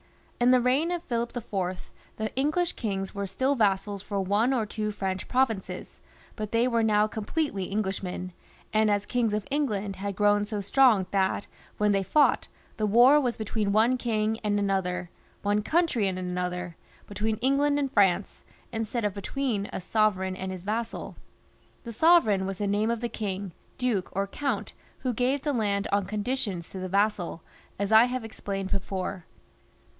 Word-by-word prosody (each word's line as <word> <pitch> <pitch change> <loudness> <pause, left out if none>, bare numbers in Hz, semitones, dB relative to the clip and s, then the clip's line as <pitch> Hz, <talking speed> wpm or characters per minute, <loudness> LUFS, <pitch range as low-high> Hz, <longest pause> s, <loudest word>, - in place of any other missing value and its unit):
In 245 +1 +4
the 255 0 +6
reign 260 +7 +2
of 350 -1 -2
Philip 235 -4 -2
rV. 190 -6 -3 0.4
the 220 0 -3
English 310 +6 +1
kings 195 -4 -3
were 200 0 -3
still 260 +9 +1
vassals 200 -4 +1
for 200 0 -3
one 205 +6 +2
or 240 -5 +1
two 215 0 -3
French 190 -2 -3
provinces, 250 -6 -1 0.4
but 215 -2 -5
they 230 +2 +3
were 235 -2 +2
now 210 -1 +4
completely 215 - -2
English 195 0 -2
men, 180 -1 -5 0.4
and 215 0 +4
as 205 -1 +1
kings 240 -3 0
of 210 - -3
England 210 -9 -1
had 200 0 -4
grown 205 +1 +3
so 210 -1 -3
strong, 210 -1 +4
that 195 0 +1 0.3
when 210 0 +3
they 195 -1 +2
fought, 290 +10 +3 0.3
the 215 - +1
war 245 +8 +6
was 245 -3 -1
between 215 -1 -1
one 225 +5 +4
king 220 -2 0
and 205 -1 +1
another, 180 -3 -1 0.3
one 205 +1 +2
country 305 - +1
and 185 -1 -2
another, 180 -1 -3 0.3
between 215 +2 -2
England 275 +4 +2
and 275 -2 -1
France, 195 -4 +2 0.3
instead 225 0 -2
of 205 - 0
between 205 0 -2
a - - -4
sovereign 190 -1 +1
and 190 0 -4
his 185 -2 -7
vassal. 225 +3 -3 0.7
The 235 - -6
sovereign 220 - +4
was 195 -1 -4
the 205 - -2
name 205 +2 +1
of 235 -1 -1
the 240 - -2
king, 200 -4 -4 0.3
duke, 235 -7 0
or 195 +1 0
count 220 -1 -3 0.3
who 255 -2 -1
gave 255 +4 0
the 295 - 0
land 205 -4 0
on 200 -1 +2
conditions 205 -4 -2
to 190 - -6
the 185 0 -4
vassal, 200 -4 0 0.3
as 200 +1 -2
I 220 +2 +8
have 250 -1 -3
explained 195 -3 -5
before. 190 -1 -3
210 Hz, 175 wpm, -27 LUFS, 195-240 Hz, 0.7 s, I